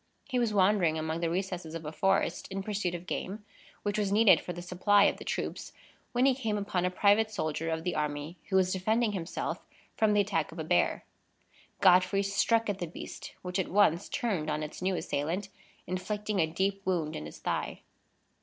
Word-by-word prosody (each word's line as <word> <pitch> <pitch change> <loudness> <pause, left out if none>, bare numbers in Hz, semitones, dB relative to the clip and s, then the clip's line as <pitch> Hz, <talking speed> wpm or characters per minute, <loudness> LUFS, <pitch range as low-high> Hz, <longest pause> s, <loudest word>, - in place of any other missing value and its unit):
He 255 -3 +1
was 235 -3 +1
wandering 190 -5 +3
among 160 +1 -2
the 170 -1 0
recesses 180 -2 -3
of 165 -1 -6
a 150 - -4
forest 190 -1 +1
in 195 0 -4
pursuit 195 -4 -2
of 175 +1 -7
game, 205 +3 -4 0.4
which 205 0 -1
was 200 -2 0
needed 205 -5 +6
for - - -5
the 175 0 -7
supply 195 +3 +4
of - - +3
the - - -9
troops, - - -4 0.4
when 245 +1 +2
he 270 - +5
came 225 -5 -2
upon 190 -3 -1
a - - +2
private 205 +4 +3
soldier 165 -5 -2
of 160 0 -2
the 180 - -1
army, 150 +2 -3
who 190 - 0
was 185 -1 +3
defending 220 +4 +1
himself 185 -3 -4 0.3
from 215 -1 +3
the 205 - +5
attack 180 -7 -1
of 165 - -11
a 160 - -3
bear. 90 - +1 0.8
Godfrey 185 +1 +5
struck 225 +3 +2
at 200 -2 -2
the 175 - -3
beast, 160 - -8
which 180 +1 -2
at 190 - 0
once 185 -4 +3
turned 200 - -1
on 155 0 -1
its 150 - -7
new 185 0 +1
assailant, 175 +6 -2 0.4
inflicting 205 +3 -2
a 160 - +3
deep 195 +4 -1
wound 170 -5 -1
in 75 - -5
his 75 - -10
thigh. - - -3
185 Hz, 200 wpm, -30 LUFS, 165-205 Hz, 0.8 s, needed